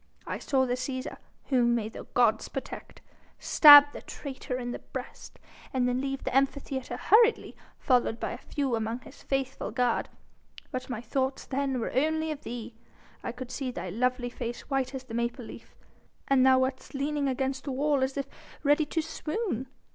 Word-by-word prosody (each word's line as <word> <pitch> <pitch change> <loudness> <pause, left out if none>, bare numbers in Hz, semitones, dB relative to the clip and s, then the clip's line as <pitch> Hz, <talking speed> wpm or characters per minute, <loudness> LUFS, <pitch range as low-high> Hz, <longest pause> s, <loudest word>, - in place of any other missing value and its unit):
I - - -4
saw 265 -2 +1
the 245 - -1
Cæsar 255 +1 -4 0.3
whom 240 -3 +3
may 220 -3 -1
the 220 - -9
gods 225 -3 +3
protect 270 - -7 0.4
stab 290 -1 +9
the - - -8
traitor 265 -3 -6
in 245 -1 -4
the - - -5
breast, - - -9 0.3
and 255 -1 +1
then 250 +1 0
leave 270 0 -3
the - - -3
Amphitheatre 270 -1 0
hurriedly, 460 +2 +4 0.2
followed 245 -3 +2
by - - -3
a - - -6
few 275 -5 -2
among 225 +2 -3
his 270 - -14
faithful 270 -1 -2
guard. 245 -2 0 0.6
But 255 0 -5
my 235 -3 -4
thoughts 265 +3 -2
then 270 -1 -1
were 230 - -3
only 315 +3 +1
of 300 -1 -6
thee. 240 -2 -7 0.5
I - - -4
could 250 +1 -8
see 260 0 -3
thy 185 -6 -5
lovely 250 +3 0
face 240 -1 -5
white 270 0 0
as 260 - -5
the 250 -3 -11
maple 235 +1 -2
leaf, - - -12 0.5
and 270 -2 +4
thou 260 0 +6
wast 260 +1 -2
leaning 285 +1 -1
against 265 0 -2
the 280 - -3
wall 285 +1 +1
as 265 +1 -1
if 275 - -1 0.4
ready 295 +1 +3
to 320 +1 -1
swoon. 310 - -3
260 Hz, 180 wpm, -28 LUFS, 245-275 Hz, 0.6 s, stab